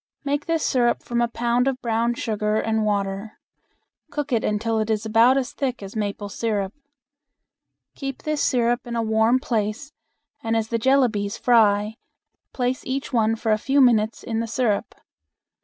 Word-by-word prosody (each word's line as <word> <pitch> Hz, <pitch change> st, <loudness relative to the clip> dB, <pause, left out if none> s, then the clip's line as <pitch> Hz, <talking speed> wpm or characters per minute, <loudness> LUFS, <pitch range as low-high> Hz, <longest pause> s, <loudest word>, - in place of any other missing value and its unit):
Make 290 Hz, 0 st, -2 dB
this 330 Hz, -2 st, 0 dB
syrup 240 Hz, -2 st, +1 dB
from 240 Hz, 0 st, -1 dB
a 235 Hz, -, +2 dB
pound 240 Hz, +2 st, 0 dB
of 265 Hz, -1 st, -1 dB
brown 235 Hz, 0 st, 0 dB
sugar 215 Hz, -2 st, -1 dB
and 220 Hz, 0 st, 0 dB
water. 200 Hz, 0 st, -2 dB, 0.7 s
Cook 295 Hz, -1 st, -4 dB
it 230 Hz, -, +1 dB
until 220 Hz, +1 st, 0 dB
it 215 Hz, 0 st, -1 dB
is 215 Hz, 0 st, 0 dB
about 230 Hz, +4 st, +5 dB
as 270 Hz, 0 st, -2 dB
thick 255 Hz, -6 st, -3 dB
as 195 Hz, +2 st, -9 dB
maple 205 Hz, 0 st, -3 dB
syrup. 205 Hz, -2 st, -2 dB, 1.2 s
Keep 270 Hz, -2 st, -6 dB
this 305 Hz, -1 st, -1 dB
syrup 240 Hz, -1 st, +1 dB
in 235 Hz, -, -4 dB
a 230 Hz, -, 0 dB
warm 220 Hz, +2 st, +3 dB
place 235 Hz, +2 st, -2 dB, 0.5 s
and 225 Hz, 0 st, 0 dB
as 220 Hz, 0 st, -2 dB
the 230 Hz, -, 0 dB
jellabies 225 Hz, -6 st, +2 dB
fry 215 Hz, -2 st, +3 dB, 0.5 s
place 250 Hz, 0 st, -2 dB
each 270 Hz, +1 st, -4 dB
one 225 Hz, -1 st, +2 dB
for 225 Hz, 0 st, -1 dB
a 215 Hz, -, +2 dB
few 270 Hz, +5 st, +1 dB
minutes 230 Hz, -4 st, +3 dB
in 225 Hz, -1 st, -2 dB
the 230 Hz, -, -2 dB
syrup. 225 Hz, -2 st, -1 dB
230 Hz, 170 wpm, -23 LUFS, 215-255 Hz, 1.2 s, about